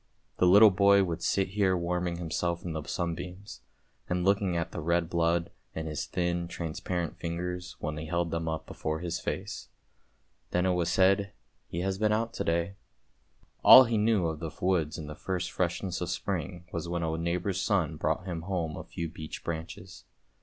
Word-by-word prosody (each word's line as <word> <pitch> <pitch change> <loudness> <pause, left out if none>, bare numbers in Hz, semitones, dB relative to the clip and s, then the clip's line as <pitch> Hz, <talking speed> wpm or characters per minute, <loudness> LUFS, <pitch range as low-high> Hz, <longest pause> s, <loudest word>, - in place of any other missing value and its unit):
The 90 - +4
little 105 +3 +8
boy 100 +1 +5
would 85 -2 -3
sit 95 -1 +1
here 95 -2 +2
warming 90 0 -1
himself 85 +1 -2
in 85 - -3
the 80 - -3
sunbeams, 90 +5 -5 0.5
and 90 0 0
looking 100 -3 +2
at 85 0 -2
the - - -5
red 85 +1 +1
blood 85 0 +1 0.2
in 80 - -3
his 75 -2 -3
thin 85 -1 -1
transparent 85 0 -3
fingers 90 +1 -4
when 75 0 -3
he 80 +1 -5
held 85 0 -1
them 80 0 -2
up 80 -1 -3
before 80 0 -4
his 85 -1 -2
face. - - -4 0.8
Then 90 +1 +1
it 95 - +3
was 85 -1 0
said, 95 +2 +3 0.2
" - - -44
he 85 - -3
has 95 +1 -1
been 105 0 +2
out 115 +2 0
to - - -2
day." 85 +3 0 0.9
All 130 - +11
he 115 -3 0
knew 105 -4 +3
of 80 -2 -2
the 80 - -4
woods 90 -5 +1
in 80 - -6
the 75 - -6
first 90 +3 -3
freshness 90 +1 -2
of 90 - -2
spring 90 -1 -3
was 85 0 -3
when 85 -1 -1
a 80 0 -1
neighbour's 90 +3 -1
son 85 -6 +1
brought 80 +4 -1
him 85 -3 -4
home 85 -3 -2
a - - -6
few 85 - -5
beech 80 -1 -8
branches. 85 +2 -6
85 Hz, 190 wpm, -29 LUFS, 85-95 Hz, 0.9 s, All